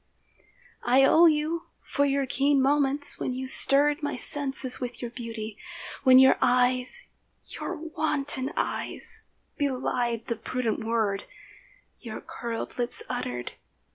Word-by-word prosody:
I 260 Hz, +3 st, +4 dB
owe 330 Hz, +5 st, +6 dB
you 315 Hz, +2 st, -1 dB
for 285 Hz, 0 st, -1 dB, 0.2 s
keen 275 Hz, +2 st, +1 dB
moments 280 Hz, +1 st, +2 dB
when 255 Hz, -, -3 dB
you 260 Hz, +1 st, -5 dB
stirred 285 Hz, +3 st, +4 dB
My 290 Hz, -1 st, -3 dB
senses 270 Hz, -1 st, 0 dB
with 245 Hz, -1 st, -6 dB
your 240 Hz, -1 st, -6 dB
beauty, 225 Hz, -3 st, -8 dB, 0.4 s
when 255 Hz, -1 st, +6 dB
your 265 Hz, 0 st, +5 dB
eyes 250 Hz, -, +2 dB, 0.4 s
(Your 365 Hz, -, -6 dB
wanton 300 Hz, -4 st, -1 dB
eyes) 455 Hz, -1 st, +2 dB, 0.4 s
belied 250 Hz, -4 st, -2 dB
the 235 Hz, -, -4 dB
prudent 235 Hz, 0 st, -3 dB
word 220 Hz, -3 st, -1 dB, 0.7 s
Your -, -, -8 dB
curled 235 Hz, +1 st, -7 dB
lips 245 Hz, 0 st, +1 dB
uttered. 125 Hz, -, -4 dB
260 Hz, 120 wpm, -26 LUFS, 240-290 Hz, 0.7 s, owe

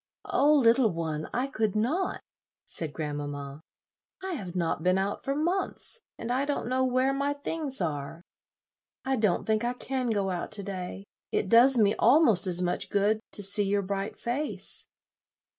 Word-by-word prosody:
"Oh, 300 Hz, +2 st, +3 dB
little 240 Hz, -3 st, +4 dB
one, 160 Hz, -3 st, -4 dB
I 250 Hz, +2 st, -1 dB
could 220 Hz, -7 st, -2 dB
not," 300 Hz, -, -1 dB, 0.4 s
said 160 Hz, -3 st, -4 dB
grandmamma; 145 Hz, -1 st, -6 dB, 0.6 s
"I 380 Hz, -, -4 dB
have 185 Hz, -, -7 dB
not 170 Hz, -3 st, -1 dB
been 185 Hz, +2 st, +2 dB
out 195 Hz, +1 st, -3 dB
for 275 Hz, -, -2 dB
months, 365 Hz, +8 st, 0 dB, 0.2 s
and 230 Hz, -, -5 dB
I 260 Hz, +2 st, 0 dB
don't 285 Hz, -4 st, -3 dB
know 255 Hz, +1 st, 0 dB
where 255 Hz, +1 st, +1 dB
my 280 Hz, +1 st, -1 dB
things 285 Hz, -1 st, -1 dB
are. 155 Hz, 0 st, -4 dB, 0.8 s
I 265 Hz, 0 st, 0 dB
don't 210 Hz, -7 st, 0 dB
think 220 Hz, 0 st, 0 dB
I 240 Hz, +1 st, -1 dB
can 255 Hz, 0 st, -3 dB
go 200 Hz, -3 st, -1 dB
out 175 Hz, -1 st, -4 dB
to 205 Hz, -2 st, -3 dB
day. 190 Hz, 0 st, -6 dB, 0.3 s
It 190 Hz, -, -1 dB
does 245 Hz, +4 st, +6 dB
me 210 Hz, -2 st, +3 dB
almost 230 Hz, -, +5 dB
as 180 Hz, 0 st, +3 dB
much 175 Hz, -, -2 dB
good 205 Hz, +2 st, +1 dB
to 205 Hz, -, +3 dB
see 200 Hz, +1 st, +5 dB
your 200 Hz, 0 st, 0 dB
bright 200 Hz, +2 st, -4 dB
face." 270 Hz, +6 st, +2 dB
215 Hz, 170 wpm, -27 LUFS, 185-265 Hz, 0.8 s, does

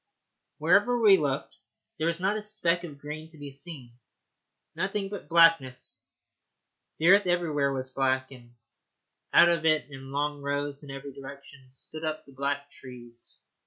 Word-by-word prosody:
Wherever 245 Hz, 0 st, +3 dB
we 210 Hz, -4 st, +7 dB
looked 140 Hz, -6 st, -3 dB, 0.4 s
there 160 Hz, -, +1 dB
was 170 Hz, 0 st, 0 dB
not 195 Hz, +3 st, +1 dB
a 215 Hz, -, -3 dB
speck 180 Hz, -5 st, 0 dB
of 150 Hz, -5 st, -8 dB
green 150 Hz, +2 st, -7 dB
to 160 Hz, -, -15 dB
be 145 Hz, -1 st, -8 dB
seen 135 Hz, -5 st, -6 dB, 0.7 s
nothing 195 Hz, +1 st, -2 dB
but 205 Hz, -2 st, -8 dB
blackness. 165 Hz, -6 st, +3 dB, 0.9 s
The 165 Hz, +2 st, +3 dB
earth 200 Hz, 0 st, +6 dB
everywhere 155 Hz, -6 st, +1 dB
was 130 Hz, -1 st, -4 dB
black, 130 Hz, 0 st, 0 dB
and 120 Hz, -2 st, -15 dB, 0.8 s
out 175 Hz, -, +7 dB
of 170 Hz, -2 st, +1 dB
it 155 Hz, -4 st, +3 dB
in 135 Hz, 0 st, -10 dB
long 145 Hz, +1 st, -2 dB
rows 145 Hz, 0 st, -3 dB
in 145 Hz, -, -11 dB
every 135 Hz, 0 st, -8 dB
direction 140 Hz, -1 st, -12 dB
stood 155 Hz, +4 st, -9 dB
up 155 Hz, 0 st, -3 dB
the 140 Hz, -, -16 dB
black 140 Hz, +1 st, -3 dB
trees. 120 Hz, -2 st, -12 dB
145 Hz, 160 wpm, -28 LUFS, 135-170 Hz, 0.9 s, we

